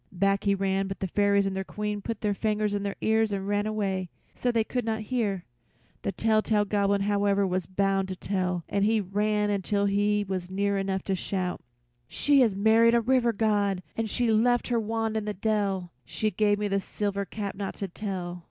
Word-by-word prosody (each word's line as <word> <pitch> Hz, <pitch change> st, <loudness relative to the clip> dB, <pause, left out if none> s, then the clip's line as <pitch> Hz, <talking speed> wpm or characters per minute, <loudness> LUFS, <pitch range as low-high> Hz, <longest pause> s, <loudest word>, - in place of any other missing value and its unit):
Back 195 Hz, +2 st, +1 dB
he 200 Hz, 0 st, +3 dB
ran, 195 Hz, 0 st, 0 dB
but 195 Hz, -, -6 dB
the -, -, -2 dB
fairies 200 Hz, +1 st, +2 dB
and 195 Hz, -1 st, -2 dB
their 190 Hz, -, -2 dB
Queen 210 Hz, +1 st, -4 dB
put 225 Hz, 0 st, -5 dB
their 210 Hz, -1 st, +1 dB
fingers 210 Hz, 0 st, 0 dB
in 205 Hz, -, -1 dB
their 200 Hz, 0 st, -3 dB
ears 220 Hz, 0 st, +2 dB
and 195 Hz, -1 st, -3 dB
ran 205 Hz, +1 st, 0 dB
away, 195 Hz, -4 st, -2 dB, 0.2 s
so 245 Hz, -, 0 dB
they 230 Hz, -2 st, +2 dB
could 245 Hz, +2 st, -2 dB
not 220 Hz, 0 st, -2 dB
hear. 210 Hz, -5 st, -2 dB, 0.6 s
The -, -, -2 dB
telltale 215 Hz, +1 st, +2 dB
Goblin, 200 Hz, -1 st, +1 dB
however, 200 Hz, 0 st, +2 dB
was 185 Hz, -1 st, -1 dB
bound 195 Hz, 0 st, +1 dB
to 190 Hz, -, -4 dB
tell, 180 Hz, -2 st, -2 dB
and 200 Hz, -, 0 dB
he 220 Hz, +1 st, +3 dB
ran 210 Hz, +1 st, 0 dB
until 200 Hz, 0 st, 0 dB
he 205 Hz, +1 st, +1 dB
was 185 Hz, -2 st, -3 dB
near 200 Hz, +1 st, 0 dB
enough 195 Hz, -1 st, -2 dB
to 195 Hz, -, -1 dB
shout: 185 Hz, -1 st, -3 dB, 0.5 s
"She 285 Hz, -, +3 dB
has 225 Hz, -6 st, +3 dB
married 225 Hz, +3 st, +5 dB
a -, -, +5 dB
River 245 Hz, 0 st, +3 dB
God 205 Hz, -3 st, +1 dB
and 225 Hz, -1 st, -2 dB
she 240 Hz, +3 st, 0 dB
left 240 Hz, +3 st, +2 dB
her 240 Hz, -1 st, +2 dB
wand 225 Hz, 0 st, -2 dB
in 215 Hz, -1 st, -1 dB
the 210 Hz, -1 st, -3 dB
dell; 195 Hz, -4 st, -1 dB, 0.3 s
they 215 Hz, -1 st, +2 dB
gave 205 Hz, +1 st, +2 dB
me 210 Hz, 0 st, -1 dB
this 195 Hz, -1 st, 0 dB
silver 200 Hz, -1 st, -2 dB
cap 200 Hz, 0 st, -5 dB
not 195 Hz, 0 st, -4 dB
to 195 Hz, -, -4 dB
tell." 180 Hz, -2 st, -5 dB
205 Hz, 205 wpm, -27 LUFS, 195-215 Hz, 0.6 s, married